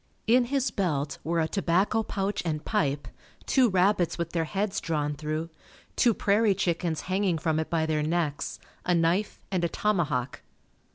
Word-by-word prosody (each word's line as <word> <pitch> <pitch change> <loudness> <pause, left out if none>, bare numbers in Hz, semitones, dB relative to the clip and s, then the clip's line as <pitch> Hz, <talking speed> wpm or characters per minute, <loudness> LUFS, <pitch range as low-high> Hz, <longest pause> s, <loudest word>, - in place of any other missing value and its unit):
In 245 +2 +4
his 270 +1 0
belt 150 -7 -1
were 165 +1 0
a 160 - +1
tobacco 195 +4 +1
pouch 200 -1 -2
and 155 -3 -3
pipe, 145 -9 0 0.4
two 255 -3 +4
rabbits 185 -2 +2
with 170 -1 -3
their 165 -2 0
heads 195 +4 -2
drawn 150 -3 -1
through, 155 +2 -4 0.4
two 235 -4 +3
prairie 205 0 +3
chickens 170 -3 -1
hanging 185 -2 0
from 160 0 0
it 160 - -3
by 165 -2 +1
their 155 -1 0
necks, 155 -2 -1 0.3
a 180 - +2
knife 170 +5 +1
and 185 -3 0
a 170 - +1
tomahawk. 155 -12 -1
170 Hz, 165 wpm, -27 LUFS, 160-200 Hz, 0.4 s, In